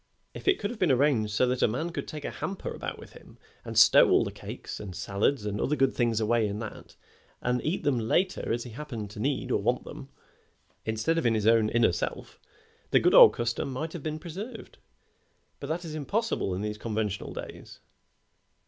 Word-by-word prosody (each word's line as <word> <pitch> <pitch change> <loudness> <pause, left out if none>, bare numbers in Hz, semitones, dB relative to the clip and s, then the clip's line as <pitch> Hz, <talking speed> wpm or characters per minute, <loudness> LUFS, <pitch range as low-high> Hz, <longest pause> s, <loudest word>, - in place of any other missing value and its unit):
If - - -10
it 390 - +5
could 205 +1 -3
have 240 - -9
been 180 -6 +3
arranged 125 -5 +2
so 105 +5 +2
that 125 0 -1
a - - +5
man 155 +10 -2
could - - -5
take 150 -2 -7
a - - -3
hamper 195 - -5
about - - -5
with - - -13
him - - -16 0.3
and - - -6
stow - - +7
all - - +5
the - - -4
cakes - - -8
and 95 -4 -7
salads 105 +6 0
and 105 -1 -2
other 150 - +1
good 135 -2 +2
things 115 -3 +1
away 110 0 +2
in 100 0 -4
that, 110 -1 -8 0.4
and 125 0 -1
eat 160 +5 -1
them 135 -4 +1
later 175 - 0
as 120 +1 -1
he 120 - -9
happened 115 -5 -6
to 105 - -9
need 130 +1 -1
or 105 - +1
want 120 +4 0
them, 135 - -10 0.8
instead 110 +10 0
of 165 - -3
in 115 - +2
his 105 -1 -1
own 110 -1 +4
inner 115 -3 +3
self, 85 - -5 0.5
the - - +5
good - - +3
old - - +10
custom 120 +3 -2
might 155 +5 -4
have 170 - -6
been 155 +1 -3
preserved, 180 +9 -8 0.8
but 140 - -6
that 170 +4 -3
is 160 - -6
impossible 155 - -1
in 95 - -4
these 105 0 -4
conventional 105 -3 -3
days." - - -9
125 Hz, 210 wpm, -28 LUFS, 110-155 Hz, 0.8 s, old